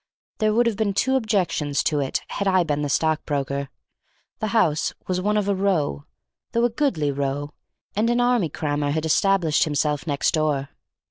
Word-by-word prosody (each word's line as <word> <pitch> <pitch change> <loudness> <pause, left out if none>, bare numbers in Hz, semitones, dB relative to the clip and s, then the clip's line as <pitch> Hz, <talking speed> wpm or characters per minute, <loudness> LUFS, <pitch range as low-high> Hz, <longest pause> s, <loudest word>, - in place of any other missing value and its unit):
There 215 0 +2
would 235 +3 +3
have 230 -3 0
been 205 -3 0
two 265 +5 +2
objections 190 - 0
to 150 - +1
it 135 -2 -2
had 200 - -2
I 185 -2 +4
been 150 -3 -1
the 145 - -2
stockbroker. 140 -3 -1 0.7
The 215 - -1
house 180 -9 +1
was 185 0 -1
one 210 +2 +1
of 205 -1 0
a 200 - +2
row, 180 - 0 0.5
though 235 +1 +3
a 240 - +1
goodly 215 - 0
row, 140 +1 -2 0.4
and 220 +3 +2
an 240 0 +2
army 245 -8 +2
crammer 145 -1 -2
had 155 +2 -1
established 175 -2 +3
himself 150 0 -1
next 140 -2 +1
door. 150 -3 0
160 Hz, 180 wpm, -23 LUFS, 145-210 Hz, 0.7 s, I